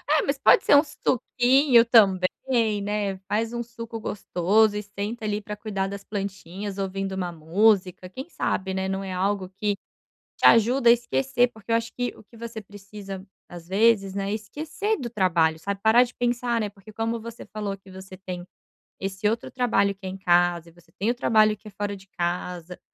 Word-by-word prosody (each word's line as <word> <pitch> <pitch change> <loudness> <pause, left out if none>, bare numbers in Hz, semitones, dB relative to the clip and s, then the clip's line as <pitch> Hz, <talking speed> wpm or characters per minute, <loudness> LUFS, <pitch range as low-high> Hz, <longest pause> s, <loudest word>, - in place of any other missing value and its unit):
É - - +3
mas 275 0 0
pode 275 - +5
ser - - +6
um 285 - +7
suquinho 255 -2 +3
também, 215 +1 +3
né, 205 -1 -2
faz 225 +3 -1
um 235 - -2
suco 230 -1 -8
gostoso 205 +1 +1
e 210 - -3
senta 205 +3 -5
ali 210 0 -1
para 210 0 -6
cuidar 200 -2 -3
das 200 0 -7
plantinhas 195 -1 -5
ouvindo 195 0 -3
uma 180 -2 -3
música, 180 +2 +1
quem 260 - -8
sabe, 190 - -2
né, 190 0 -2
não 195 +1 -2
é 190 - -5
algo 190 0 -1
que 205 +2 -2 0.6
te - - +3
ajuda 235 +3 +5
a 235 - +10
esquecer 245 +1 +1
porque 220 0 -13
eu 230 - +5
acho 230 0 -3
que 245 0 -2
o - - -15
que 230 - -19
você 230 -1 -7
precisa 200 -1 -9 0.2
às 175 -1 -10
vezes, 200 -1 +3
né, 200 0 -2
esquecer 310 - -3
do 240 - -5
trabalho 170 -7 +2
sabe 200 +4 -4
parar 230 +3 +6
de 245 - -10
pensar, 240 -1 0
né, 210 -2 -2
porque 205 +1 -15
como 225 +1 -2
você 230 +1 -9
falou 205 -2 -3
que 195 0 -18
você 190 0 -10
tem 180 -2 -7 0.6
esse 195 +1 -2
outro 225 +2 -1
trabalho 200 -6 +1
que 195 - -13
é 185 - -3
em 190 - -6
casa 175 -3 +2
e - - -18
você 175 +1 -23
tem 210 +4 +1
o 240 - +1
trabalho 215 -4 +3
que 215 - -15
é 210 - -9
fora 205 0 -4
de 195 0 -15
casa, 175 -1 -4
205 Hz, 200 wpm, -25 LUFS, 190-230 Hz, 0.6 s, a